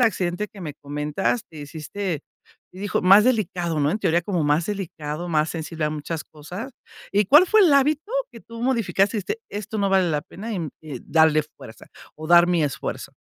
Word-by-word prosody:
accidente 200 -3 0
que 200 -4 -12
me 150 - -5
comentas, 150 +10 -2
te 160 - -13
hiciste 155 +3 -5 0.5
hi 190 +2 -8
hijo 205 - -1
más 195 +4 +7
delicado, 180 -9 0
¿no? 145 0 +2
En 210 - -1
teoría 170 -3 +1
como 175 -3 -1
más 150 +3 +2
delicado, 175 -4 -5
más 155 -1 +1
sensible 160 -1 -4
a 150 - 0
muchas 155 +1 -5
cosas, 180 - -9 0.4
¿y 205 0 +3
cuál 295 - +7
fue 435 +3 +5
el 365 -6 +6
hábito 300 +7 +2 0.2
que 230 - -11
tú 230 +1 -10
modificaste?, 230 -4 +1
y - - -1
dijiste: 430 - -4
"Esto 210 +1 -5
no 200 -2 +1
vale 190 -2 +3
la 150 -1 -1
pena 220 +8 -8
y - - -2
mm, 160 -4 -4
eh, 145 -6 -8
darle 160 -1 +3
fuerza 115 -6 -14 0.3
o 155 - -8
dar 175 +1 +7
mi 175 -3 +2
esfuerzo". 140 - -4
175 Hz, 205 wpm, -23 LUFS, 155-210 Hz, 0.5 s, más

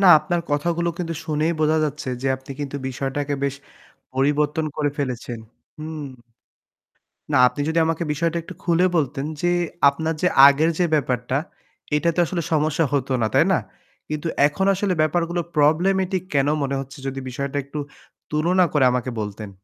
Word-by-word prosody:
না, 195 - +5
আপনার 170 +3 -1
কথাগুলো 170 +4 0
কিন্তু 165 -2 -3
শুনেই 155 +2 +1
বোঝা 155 +1 +3
যাচ্ছে 150 -2 -4
যে, - - -1
আপনি 130 +1 -10
কিন্তু 145 -1 -4
বিষয়টাকে 135 +2 -2
বেশ 140 - -1 0.6
পরিবর্তন 145 +4 +1
করে 150 -1 +1
ফেলেছেন। 125 -3 -3 0.4
হুম। 155 -1 -6 1.3
না, - - +5
আপনি 125 +4 -4
যদি 165 +1 +2
আমাকে 165 +1 -1
বিষয়টা 165 +3 -1
একটু 185 - -9
খুলে 175 +1 +3
বলতেন 140 -3 0 0.2
যে, 175 - +2 0.4
আপনার 160 +3 -2
যে 180 - +3 0.2
আগের 145 +3 +4
যে 180 - +4
ব্যাপারটা, 130 -3 0 0.6
এটাতে 170 +3 +1
আসলে 170 +1 -2
সমস্যা 155 +1 +2
হতো 135 -1 0
না, 110 - +2
তাই - - +5
না? - - +3 0.5
কিন্তু 155 +2 -3 0.2
এখন 150 +6 -2
আসলে 195 -1 0
ব্যাপারগুলো 170 +2 0
problematic 185 +5 +2
কেন 140 -1 +3 0.2
মনে 140 0 -1
হচ্ছে? 135 0 -8
যদি 135 0 -4
বিষয়টা 140 +3 -4
একটু 140 +2 -7 0.5
তুলনা 175 +5 +3
করে 150 -3 +3
আমাকে 125 0 -1
বলতেন। 105 0 -6
150 Hz, 160 wpm, -22 LUFS, 140-165 Hz, 1.3 s, না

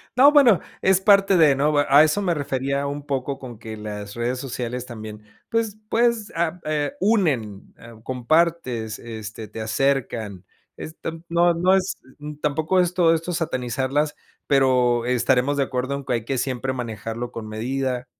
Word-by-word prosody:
No, 275 +4 +7
bueno, 255 - +6 0.2
es 190 0 +3
parte 200 -1 +5
de, 150 -4 +5
¿no? 145 +3 +2
Bue 145 -1 +2
a 145 +2 +8
eso 155 +6 +1
me 180 -3 +1
refería 140 -1 -2
un 145 +1 -4
poco 135 -1 -3
con 125 -4 -9
que 110 0 -8
las 105 -1 -7
redes 120 +2 -2
sociales 125 -1 -4
también, 110 -3 -9 0.3
pues, 225 -2 -1
pues, 235 -2 +1
ah 170 +1 -1
eh, 150 -2 -1
unen, 150 - 0
eh, 115 0 -13
compartes, 130 -4 0
este, 110 -1 -8
te 110 +1 -8
acercan. 110 -5 -1 0.3
Es 160 - -9
tan 165 0 -6
no 170 +1 +3
no 180 +3 +3
es 190 0 0 0.2
n 150 0 -8
tampoco 155 +5 +1
esto 175 -2 +3
esto 165 +2 -2
satanizarlas, 135 -1 -1 0.3
pero 125 -3 +3
estaremos 125 +3 +1
de 140 - +3
acuerdo 130 +1 -2
en 140 -1 -7
que - - -1
hay 115 -2 -2
que 135 +1 -2
siempre 130 +1 -2
manejarlo 115 -1 -5
con 110 -1 -7
medida. 125 +3 -2
135 Hz, 170 wpm, -23 LUFS, 120-165 Hz, 0.3 s, a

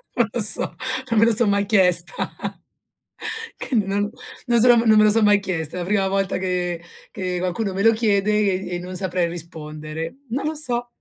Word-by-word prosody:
Non 235 -2 +1
lo 240 - -1
so. 210 - +3 0.4
Non 225 - +3
me 225 - +5
lo 230 - +3
so 225 +1 +5
mai 200 0 +1
chiesta. 190 - +3 1.4
Che 260 - -4
non, 205 -1 0 0.4
non 235 -1 +3
so 245 +1 +6
non 225 -2 +4
me 215 - +6
lo 215 - +5
sono 220 0 +4
mai 205 -1 +4
chiesta, 165 -5 -4
è - - -4
la - - -4
prima 195 0 +1
volta 195 0 -1
che 180 -2 -2 0.3
che 185 -2 -4
qualcuno 185 +3 -2
me 195 +2 -2
lo 225 - +5
chiede 210 -2 +1
e 200 -3 0
e - - -4
non 180 +1 -8
saprei 180 -2 -1
rispondere. 160 +1 -7
Non 265 +5 -3
lo 315 - -3
so. 245 -5 -1
200 Hz, 200 wpm, -21 LUFS, 180-220 Hz, 1.4 s, so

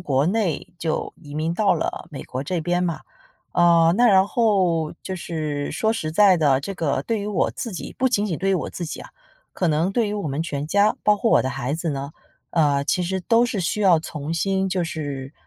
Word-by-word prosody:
国 140 -5 +1
内 195 -3 -1
就 165 -2 -2
移 145 -3 -11
民 155 +2 -1
到 195 +1 +2
了 160 - -3
美 140 - -7
国 130 +1 -5
这 180 +2 -2
边 175 +2 0
嘛。 170 -2 -2 0.5
呃， 170 -1 +5
那 245 +2 +5
然 195 -3 +5
后， 185 -9 +1
就 190 - -5
是 155 -4 -3
说 220 0 +1
实 155 -9 -3
在 195 0 +6
的， 140 -5 +3
这 195 - -5
个 140 -6 -1
对 225 +8 -1
于 205 - -4
我 210 - 0
自 230 - -6
己 180 - -6
不 260 +1 +3
仅 210 -4 +1
仅 170 -6 -3
对 195 - -1
于 - - +3
我 180 - -2
自 175 - -5
己 155 - -6
啊， - - -11 0.4
可 180 - -1
能 160 +4 +1
对 220 0 +1
于 210 - -3
我 200 -7 -3
们 140 +3 -2
全 145 -3 -4
家， 200 +5 +3
包 210 0 +4
括 225 +3 +1
我 - - +5
的 130 - -2
孩 135 +1 -3
子 165 0 -2
呢， 140 +1 -5 0.4
呃， 145 -4 +2
其 180 +5 +1
实 190 +2 -2
都 230 +6 +3
是 235 -5 -2
需 185 +5 -1
要 185 -5 +5
重 155 -1 -5
新 190 +3 0
就 185 -1 0
是， 145 -4 -5
170 Hz, 250 characters per minute, -23 LUFS, 150-195 Hz, 0.5 s, 在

